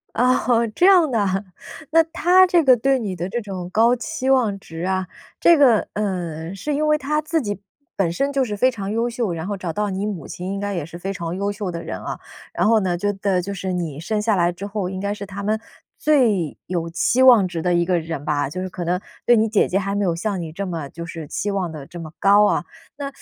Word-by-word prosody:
啊 250 +2 +3
哦， 235 -1 +3
这 360 - +3
样 360 -6 +6
的 220 -4 +1
哈。 195 +1 -1 0.5
那 325 0 +6
他 350 +3 +4
这 350 -3 +3
个 255 -2 +6
对 270 +3 +2
你 200 -6 -3
的 175 +1 -3
这 240 +3 -2
种 185 -4 -6
高 230 +5 +4
期 255 +2 -3
望 225 -7 +2
值 165 -2 -8
啊， 190 0 -1 0.3
这 340 -2 +6
个， 250 -7 +4
呃， 175 -5 -3
是 285 +9 -3
因 305 +1 0
为 305 0 +3
他 300 +2 0
自 315 +1 -1
己 205 -3 -4 0.4
本 180 -4 +1
身 275 +7 0
就 275 -1 +1
是 210 - -4
非 255 +5 +3
常 200 -4 -5
优 230 +2 0
秀， 230 -6 -2
然 165 +2 -5
后 205 -1 -3
找 175 -3 -4
到 210 0 -1
你 195 +1 -2
母 205 -6 -5
亲 185 +2 -5
应 200 - -3
该 205 0 -3
也 160 -4 -3
是 170 +1 -10
非 195 +2 -3
常 170 -1 -4
优 200 +1 -1
秀 205 -2 -4
的 170 0 -5
人 - - -5
啊。 - - -6 0.3
然 - - +1
后 225 -1 +5
呢， 180 -2 0
就 205 +4 0
等 190 -2 0
就 200 +2 -5
是 185 -1 -3
你 165 -5 -3
生 210 +6 -1
下 215 -1 +2
来 175 -1 +2
之 195 +3 -7
后， 200 -3 -3
应 185 0 -5
该 200 +1 -2
是 200 -1 -7
他 200 +1 -7
们 215 +2 0 0.4
最 225 - +2
有 170 -2 -2
期 245 +9 +2
望 235 -7 +7
值 170 -2 -4
的 180 -1 +2
一 175 - +3
个 180 -1 +2
人 160 -3 -5
吧， 145 -2 0
就 185 +5 -5
是 185 - -4
可 180 - -6
能 175 +2 0 0.3
对 240 - +6
你 220 +1 +3
姐 215 -1 +2
姐 195 - +1
还 200 +1 -2
没 205 - 0
有 175 - +1
像 195 0 -2
你 160 -2 -6
这 195 +4 -4
么 165 -5 -4
就 170 +3 -8
是 165 -2 -7
期 205 - -3
望 195 -4 -2
得 150 -3 -8
这 175 - -9
么 160 -2 -8
高 205 +1 +6
啊。 - - +1 0.3
那 280 -1 -4
200 Hz, 280 characters per minute, -21 LUFS, 175-235 Hz, 0.5 s, 望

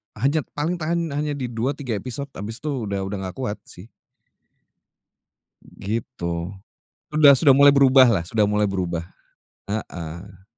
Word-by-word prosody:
hanya 140 +8 +1 0.2
paling 160 +5 -1
tahan, 165 0 -1
hanya 145 +1 -2
di 125 -3 -4
2-3 125 0 -2
episode. 135 +2 -6
Habis 110 +7 -6
tu, 150 - -2 0.2
udah 100 -1 -2
udah 100 +1 -4
gak - - -25
kuat, 125 -6 -4
sih. 95 +6 -12 1.8
Gitu. 95 -5 -5 0.6
Sudah 150 -2 +7
sudah 140 0 +5
mulai 140 0 +7
berubah 135 -1 +6
lah 100 -8 +2
sudah 110 0 +1
mulai 105 0 +1
berubah, 90 -3 -2 0.7
heeh. 95 -1 -6
115 Hz, 135 wpm, -22 LUFS, 100-140 Hz, 1.8 s, Sudah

